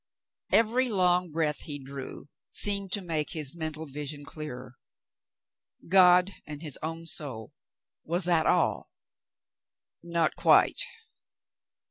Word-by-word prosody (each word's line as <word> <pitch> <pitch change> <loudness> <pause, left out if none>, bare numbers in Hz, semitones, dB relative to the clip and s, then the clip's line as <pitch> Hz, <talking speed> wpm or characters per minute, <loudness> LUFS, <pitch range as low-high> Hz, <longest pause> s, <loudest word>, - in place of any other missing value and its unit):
Every 240 +3 +3
long 180 -3 +2
breath 150 -1 -1
he 145 -2 -5
drew 135 -1 -8 0.2
seemed 200 -2 +2
to 205 - +1
make 160 -4 -2
his 150 -4 -3
mental 160 -1 -5
vision 145 0 -6
clearer. 130 -4 -8 1.1
God 180 +1 +6
and 150 +1 -8
his 150 -4 -4
own 165 +1 -5
soul 135 -9 -2 0.3
— - - -65
was 175 +3 -1
that 170 -2 +2
all? - - +1 1.1
Not 170 -1 0
quite. - - +4
160 Hz, 115 wpm, -28 LUFS, 145-180 Hz, 1.1 s, God